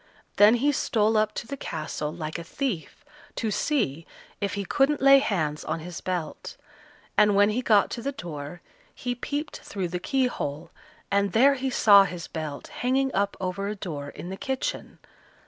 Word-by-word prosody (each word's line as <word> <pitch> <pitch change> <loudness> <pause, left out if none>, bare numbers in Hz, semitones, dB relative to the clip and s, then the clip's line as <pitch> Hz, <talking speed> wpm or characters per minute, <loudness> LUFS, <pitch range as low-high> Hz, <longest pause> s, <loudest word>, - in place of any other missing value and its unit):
Then 210 +3 +7
he 280 +5 +2
stole 220 -5 +1
up 215 0 +2
to - - -4
the 280 - -5
castle, 155 - -4
like 160 0 -5
a - - -6
thief, 220 - -4 0.3
to 220 -3 -1
see 165 - -1 0.3
if 200 -1 -2
he 200 -1 -3
couldn't 275 +7 +2
lay 275 +1 +7
hands 155 - -1
on 165 - -3
his 175 +1 -7
belt; 180 -4 -4 0.6
and 210 -1 +5
when 205 +1 +5
he 240 +4 -1
got 215 -5 +3
to 235 - -4
the 275 +4 -2
door, 165 - -7 0.3
he 245 -1 -3
peeped 290 +5 -4
through 190 -3 -4
the 180 +1 -3
keyhole, 185 - -2 0.4
and 200 -2 +2
there 270 +5 +6
he 265 0 -2
saw 200 -5 +7
his 175 -4 -6
belt 155 -3 -6
hanging 265 +2 +1
up 200 0 0
over 190 +2 -3
a 210 - -3
door 150 -8 -6
in 175 - -8
the 190 - -5
kitchen. 265 +2 -3
200 Hz, 180 wpm, -26 LUFS, 170-255 Hz, 0.6 s, Then